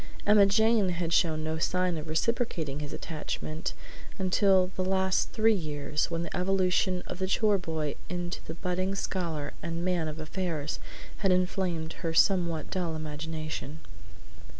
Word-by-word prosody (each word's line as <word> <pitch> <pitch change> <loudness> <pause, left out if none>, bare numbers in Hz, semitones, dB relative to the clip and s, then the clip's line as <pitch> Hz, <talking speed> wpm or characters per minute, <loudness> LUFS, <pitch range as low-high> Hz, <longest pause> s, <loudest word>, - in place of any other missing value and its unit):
Emma 205 -1 +7
Jane 220 -1 +4
had 170 -1 -1
shown 160 -3 +3
no 160 0 -2
sign 180 +1 +1
of 155 0 -5
reciprocating 160 - 0
his 145 -1 -5
attachment 155 0 -4 0.4
until 190 -1 +3
the 185 - 0
last 190 0 +1
three 225 0 +4
years, 150 -4 -1
when 165 0 -2
the - - -5
evolution 185 0 +2
of 180 - -6
the 190 - 0
chore 205 +1 +3
boy 160 -4 -2 0.2
into 175 0 -3
the 160 - -6
budding 185 +2 -1
scholar 165 -7 -2
and 170 +1 -3
man 175 -3 +1
of 155 0 -5
affairs 155 -2 -3 0.4
had 195 -2 +2
inflamed 180 -3 0
even - - -11
her 165 -2 -2
somewhat 170 -4 +3
dull 175 -4 -1
imagination. 155 - -5
175 Hz, 150 wpm, -29 LUFS, 160-190 Hz, 0.4 s, Emma